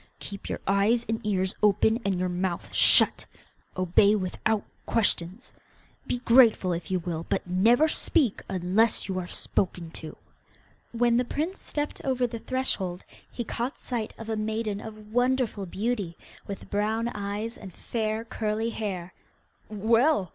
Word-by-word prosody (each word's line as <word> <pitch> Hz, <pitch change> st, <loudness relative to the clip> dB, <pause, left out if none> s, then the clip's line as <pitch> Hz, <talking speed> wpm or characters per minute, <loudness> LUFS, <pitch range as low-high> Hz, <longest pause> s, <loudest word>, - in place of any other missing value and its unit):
Keep 200 Hz, -1 st, -7 dB
your -, -, -3 dB
eyes 205 Hz, +4 st, +2 dB
and 225 Hz, +1 st, -2 dB
ears 190 Hz, -2 st, 0 dB
open, 210 Hz, +3 st, +3 dB
and 195 Hz, -2 st, 0 dB
your 185 Hz, -, 0 dB
mouth 180 Hz, 0 st, -3 dB
shut, -, -, +6 dB, 0.5 s
obey 185 Hz, +3 st, +4 dB
without 205 Hz, +2 st, -1 dB, 0.2 s
questions. 205 Hz, 0 st, 0 dB, 0.5 s
Be -, -, 0 dB
grateful 230 Hz, -7 st, +5 dB
if 170 Hz, -1 st, -5 dB
you 185 Hz, -, +1 dB
will, 165 Hz, -2 st, -4 dB
but -, -, 0 dB
never 225 Hz, -, +4 dB
speak 295 Hz, -, +1 dB
unless 190 Hz, +5 st, +1 dB
you 190 Hz, -1 st, -2 dB
are 175 Hz, -, -5 dB
spoken 175 Hz, -3 st, -2 dB
to.' 160 Hz, -1 st, -8 dB, 0.7 s
When 235 Hz, 0 st, +2 dB
the 250 Hz, -, +3 dB
prince 315 Hz, +9 st, -3 dB
stepped 295 Hz, 0 st, -3 dB
over 255 Hz, -2 st, +1 dB
the 230 Hz, -1 st, -5 dB
threshold 195 Hz, -9 st, -2 dB, 0.2 s
he 240 Hz, -, -4 dB
caught 240 Hz, +3 st, -3 dB
sight 235 Hz, -4 st, -4 dB
of 225 Hz, -, -8 dB
a 225 Hz, -, -1 dB
maiden 215 Hz, -1 st, -2 dB
of 215 Hz, -1 st, -10 dB
wonderful 245 Hz, -5 st, +1 dB
beauty, 200 Hz, -3 st, -2 dB, 0.3 s
with 200 Hz, -, -7 dB
brown 220 Hz, +3 st, 0 dB
eyes 210 Hz, +2 st, -4 dB
and 190 Hz, -, -10 dB
fair 220 Hz, +3 st, -3 dB
curly 220 Hz, 0 st, -2 dB
hair. 185 Hz, -5 st, -4 dB, 0.6 s
'Well! 225 Hz, -, +2 dB
215 Hz, 145 wpm, -27 LUFS, 190-235 Hz, 0.7 s, shut